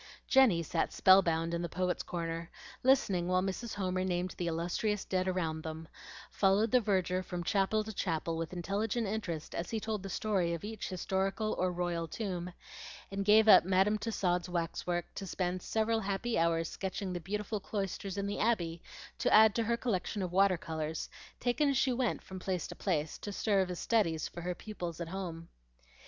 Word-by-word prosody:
Jenny 240 Hz, -11 st, +5 dB
sat 165 Hz, +1 st, -1 dB
spellbound 170 Hz, -3 st, +4 dB
in 170 Hz, -, -1 dB
the 170 Hz, -, -3 dB
Poets' 180 Hz, +1 st, -1 dB
Corner, 165 Hz, -1 st, -4 dB, 0.3 s
listening 205 Hz, -10 st, +3 dB
while 185 Hz, 0 st, +2 dB
Mrs. 195 Hz, +4 st, -3 dB
Homer 185 Hz, -2 st, -1 dB
named 180 Hz, 0 st, -1 dB
the 175 Hz, -, -3 dB
illustrious 175 Hz, +5 st, -1 dB
dead 185 Hz, 0 st, 0 dB
around 165 Hz, -4 st, -1 dB
them; 160 Hz, 0 st, -6 dB, 0.4 s
followed 205 Hz, +3 st, +3 dB
the 250 Hz, -, +5 dB
verger 185 Hz, -3 st, +1 dB
from 180 Hz, -1 st, -5 dB
chapel 205 Hz, +3 st, +1 dB
to 220 Hz, +1 st, -7 dB
chapel 165 Hz, -3 st, -1 dB
with 165 Hz, 0 st, -3 dB
intelligent 200 Hz, +6 st, -1 dB
interest 195 Hz, -7 st, -4 dB
as 170 Hz, -, -3 dB
he 225 Hz, -, -1 dB
told 215 Hz, -1 st, -3 dB
the 195 Hz, -, -6 dB
story 185 Hz, -4 st, 0 dB
of 165 Hz, -, -9 dB
each 215 Hz, 0 st, -5 dB
historical 195 Hz, +3 st, -1 dB
or 185 Hz, 0 st, 0 dB
royal 175 Hz, -1 st, -2 dB
tomb, 180 Hz, -2 st, -4 dB, 0.6 s
and 195 Hz, 0 st, -2 dB
gave 215 Hz, +1 st, +6 dB
up -, -, +9 dB
Madam 190 Hz, +4 st, +2 dB
Tussaud's 185 Hz, -5 st, -1 dB
wax 170 Hz, -1 st, -3 dB
work 175 Hz, -1 st, 0 dB
to 195 Hz, -, -6 dB
spend 180 Hz, 0 st, -2 dB
several 225 Hz, +3 st, 0 dB
happy 200 Hz, +3 st, -2 dB
hours 165 Hz, 0 st, +2 dB
sketching 190 Hz, +1 st, -4 dB
the 175 Hz, -, -3 dB
beautiful 210 Hz, +4 st, -3 dB
cloisters 195 Hz, -1 st, -4 dB
in 200 Hz, -, -1 dB
the 200 Hz, 0 st, -3 dB
Abbey 175 Hz, -7 st, 0 dB, 0.4 s
to -, -, +1 dB
add 215 Hz, 0 st, +7 dB
to 230 Hz, -, +1 dB
her 235 Hz, +1 st, +1 dB
collection 205 Hz, -3 st, -1 dB
of 180 Hz, -, -3 dB
water 195 Hz, -1 st, +4 dB
colors, 160 Hz, -1 st, -4 dB, 0.3 s
taken 255 Hz, +4 st, +2 dB
as 275 Hz, -, +1 dB
she 260 Hz, -1 st, +2 dB
went 245 Hz, -1 st, -1 dB
from 190 Hz, -1 st, -8 dB
place 185 Hz, -1 st, -2 dB
to -, -, -8 dB
place, 160 Hz, -5 st, -1 dB
to 205 Hz, -, -5 dB
serve 195 Hz, -2 st, +1 dB
as 180 Hz, -, -4 dB
studies 170 Hz, -9 st, +1 dB
for 175 Hz, -, -8 dB
her 180 Hz, +1 st, -3 dB
pupils 175 Hz, -6 st, -6 dB
at 170 Hz, -1 st, -4 dB
home. 170 Hz, -3 st, -5 dB
185 Hz, 190 wpm, -32 LUFS, 170-210 Hz, 0.6 s, up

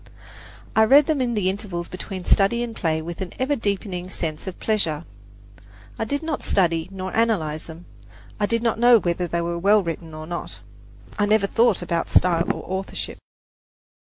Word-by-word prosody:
I 220 Hz, -, +6 dB
read 280 Hz, +5 st, +7 dB
them 305 Hz, -3 st, 0 dB
in 240 Hz, -2 st, 0 dB
the 200 Hz, -3 st, +1 dB
intervals 190 Hz, -3 st, -3 dB
between 185 Hz, 0 st, -7 dB
study 220 Hz, +4 st, +3 dB
and 230 Hz, -2 st, -5 dB
play 160 Hz, -3 st, -1 dB
with 170 Hz, +2 st, -7 dB
an 185 Hz, -, -5 dB
ever 265 Hz, +3 st, +1 dB
deepening 195 Hz, -5 st, -3 dB
sense 160 Hz, -1 st, -4 dB
of 185 Hz, -, -6 dB
pleasure. 170 Hz, -8 st, 0 dB, 0.9 s
I 225 Hz, -, 0 dB
did 285 Hz, +6 st, -2 dB
not 315 Hz, -2 st, -2 dB
study 165 Hz, -3 st, +1 dB
nor 190 Hz, -1 st, -5 dB
analyze 175 Hz, -10 st, 0 dB
them 165 Hz, +2 st, -11 dB, 0.5 s
I 205 Hz, -, +2 dB
did 230 Hz, +1 st, 0 dB
not 230 Hz, -1 st, +1 dB
know 240 Hz, 0 st, +7 dB
whether 175 Hz, -1 st, -1 dB
they 170 Hz, 0 st, -1 dB
were 170 Hz, 0 st, -2 dB
well 205 Hz, +3 st, +4 dB
written 165 Hz, -1 st, -5 dB
or 155 Hz, 0 st, -7 dB
not; 175 Hz, +1 st, -6 dB, 0.6 s
I 205 Hz, -, +3 dB
never 215 Hz, -1 st, +3 dB
thought 225 Hz, -2 st, +2 dB
about 170 Hz, -1 st, -1 dB
style 170 Hz, -1 st, +3 dB
or -, -, -6 dB
authorship. 190 Hz, +1 st, -4 dB
190 Hz, 180 wpm, -23 LUFS, 170-220 Hz, 0.9 s, read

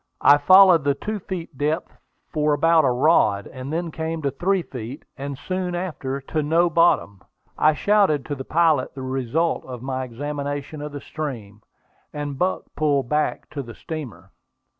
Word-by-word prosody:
I 145 Hz, -, +7 dB
followed 185 Hz, +1 st, +7 dB
the 140 Hz, 0 st, +2 dB
two 210 Hz, +8 st, -4 dB
feet 175 Hz, -5 st, -6 dB
depth 155 Hz, +4 st, -1 dB, 0.4 s
for 150 Hz, -2 st, +1 dB
about 160 Hz, +2 st, +4 dB
a -, -, +4 dB
rod, 125 Hz, -7 st, +3 dB
and 130 Hz, +2 st, -8 dB
then 165 Hz, +1 st, -2 dB
came 160 Hz, 0 st, -4 dB
to 140 Hz, -, 0 dB
three 190 Hz, +5 st, 0 dB
feet, 125 Hz, +1 st, -8 dB
and 140 Hz, -1 st, -6 dB
soon 180 Hz, +3 st, -3 dB
after 145 Hz, -7 st, -3 dB
to 155 Hz, +3 st, -2 dB
"no 165 Hz, +3 st, +2 dB
bottom." 155 Hz, -, +2 dB, 0.3 s
I 155 Hz, 0 st, +3 dB
shouted 195 Hz, -6 st, +2 dB
to 145 Hz, -, -4 dB
the 135 Hz, -2 st, -5 dB
pilot 165 Hz, +1 st, +2 dB
the 135 Hz, -, -6 dB
result 135 Hz, +5 st, -1 dB
of 125 Hz, -2 st, -8 dB
my 130 Hz, 0 st, -2 dB
examination 145 Hz, +3 st, -5 dB
of 150 Hz, 0 st, -5 dB
the 145 Hz, -1 st, -7 dB
stream, 115 Hz, -9 st, -6 dB, 0.5 s
and 145 Hz, -2 st, -5 dB
Buck 185 Hz, +1 st, 0 dB
pulled 140 Hz, -5 st, +1 dB
back 150 Hz, 0 st, 0 dB
to 145 Hz, -, -4 dB
the 115 Hz, -3 st, -10 dB
steamer. 115 Hz, -, -8 dB
150 Hz, 170 wpm, -23 LUFS, 135-165 Hz, 0.5 s, I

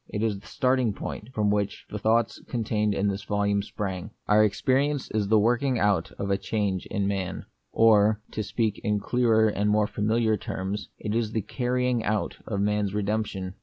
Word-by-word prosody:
It 105 Hz, -, -2 dB
is 105 Hz, -3 st, 0 dB
the 100 Hz, -, -16 dB
starting 125 Hz, -4 st, +1 dB
point 105 Hz, +3 st, -6 dB
from 105 Hz, -4 st, +1 dB
which 105 Hz, -1 st, -1 dB
the 105 Hz, -, -4 dB
thoughts 110 Hz, +2 st, +1 dB
contained 105 Hz, -3 st, 0 dB
in 100 Hz, -, +1 dB
this 100 Hz, 0 st, -2 dB
volume 100 Hz, 0 st, +1 dB
sprang: 100 Hz, -1 st, -5 dB
— -, -, -45 dB
Our 105 Hz, +1 st, +5 dB
experience 135 Hz, +6 st, +1 dB
is 105 Hz, -2 st, 0 dB
the 110 Hz, +2 st, +4 dB
working 120 Hz, +4 st, +2 dB
out 100 Hz, -6 st, +1 dB
of 100 Hz, 0 st, -3 dB
a 100 Hz, -, +1 dB
change 100 Hz, -4 st, -2 dB
in 100 Hz, -2 st, -1 dB
man; 95 Hz, -2 st, -3 dB, 0.3 s
or, 110 Hz, -1 st, +5 dB
to 110 Hz, -, -3 dB
speak 110 Hz, -1 st, -1 dB
in 105 Hz, -1 st, +1 dB
clearer 110 Hz, 0 st, +3 dB
and 105 Hz, 0 st, 0 dB
more 105 Hz, 0 st, +3 dB
familiar 110 Hz, +1 st, +1 dB
terms, 95 Hz, +2 st, -4 dB
it 105 Hz, -, -4 dB
is 115 Hz, -1 st, -1 dB
the 110 Hz, -, 0 dB
carrying 125 Hz, 0 st, 0 dB
out 105 Hz, 0 st, -1 dB
of 100 Hz, -3 st, -1 dB
man's 105 Hz, -1 st, 0 dB
redemption. 100 Hz, -3 st, -2 dB
105 Hz, 190 wpm, -26 LUFS, 100-115 Hz, 0.3 s, Our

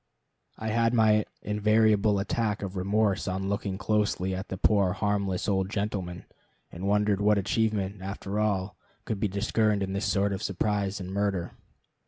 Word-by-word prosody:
I 110 Hz, -, -3 dB
had 115 Hz, +2 st, +2 dB
my 110 Hz, -2 st, +4 dB, 0.2 s
invariable 105 Hz, 0 st, +3 dB
attack 105 Hz, +1 st, -1 dB
of 100 Hz, 0 st, -5 dB
remorse 100 Hz, +2 st, +1 dB
on 95 Hz, +1 st, -2 dB
looking 100 Hz, -1 st, -2 dB
closely 105 Hz, -3 st, 0 dB
at 95 Hz, +1 st, -4 dB
the 95 Hz, -, -5 dB
poor 100 Hz, -2 st, +3 dB
harmless 100 Hz, -2 st, -1 dB
old 95 Hz, -2 st, +1 dB
gentleman, 100 Hz, -4 st, -3 dB, 0.5 s
and 90 Hz, +3 st, -5 dB
wondered 105 Hz, 0 st, +2 dB
what 105 Hz, 0 st, +4 dB
achievement, 100 Hz, -1 st, 0 dB
after 100 Hz, +1 st, -4 dB
all, 100 Hz, -2 st, 0 dB, 0.3 s
could 110 Hz, -, -3 dB
be 105 Hz, -, +1 dB
discerned 105 Hz, +1 st, +1 dB
in 95 Hz, 0 st, -3 dB
this 100 Hz, +2 st, -1 dB
sort 100 Hz, 0 st, +1 dB
of 95 Hz, -, -4 dB
surprise 100 Hz, +1 st, -1 dB
and 95 Hz, -1 st, -6 dB
murder. 100 Hz, -3 st, -1 dB
100 Hz, 160 wpm, -28 LUFS, 95-105 Hz, 0.5 s, my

